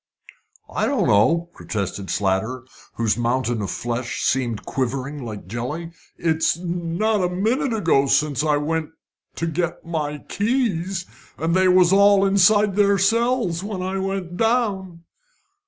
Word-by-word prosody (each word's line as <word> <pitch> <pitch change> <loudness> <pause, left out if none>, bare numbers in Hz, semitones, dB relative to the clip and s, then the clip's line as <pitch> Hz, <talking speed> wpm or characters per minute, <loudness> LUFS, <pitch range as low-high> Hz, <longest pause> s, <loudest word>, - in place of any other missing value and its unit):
"I - - -1
don't - - +1
know," 165 +12 +3
protested 100 -2 -4
Slater, 105 +6 -1 0.3
whose 115 -1 0
mountain 120 -1 0
of 100 - -3
flesh 120 0 -3
seemed 120 -4 0
quivering 135 +2 -3
like 110 -5 -7
jelly. 125 - -5 0.3
"It's 160 -1 +1
not 175 +4 -1
a 180 - +1
minute 225 +9 0
ago 165 -11 +2
since 150 -1 +1
I 150 -2 +2
went 155 +1 -2 0.5
to 165 - -2
get 165 +1 -3
my 150 -3 -3
keys, 195 -6 -1 0.3
and 165 +1 -1
they 185 +1 +4
was 180 0 +5
all 200 0 +5
inside 200 +1 +4
their 200 -1 +4
cells 225 -3 +1
when 200 -3 -4
I 190 +1 -2
went 190 -2 -3
down." 200 -7 0
170 Hz, 140 wpm, -22 LUFS, 135-195 Hz, 0.5 s, was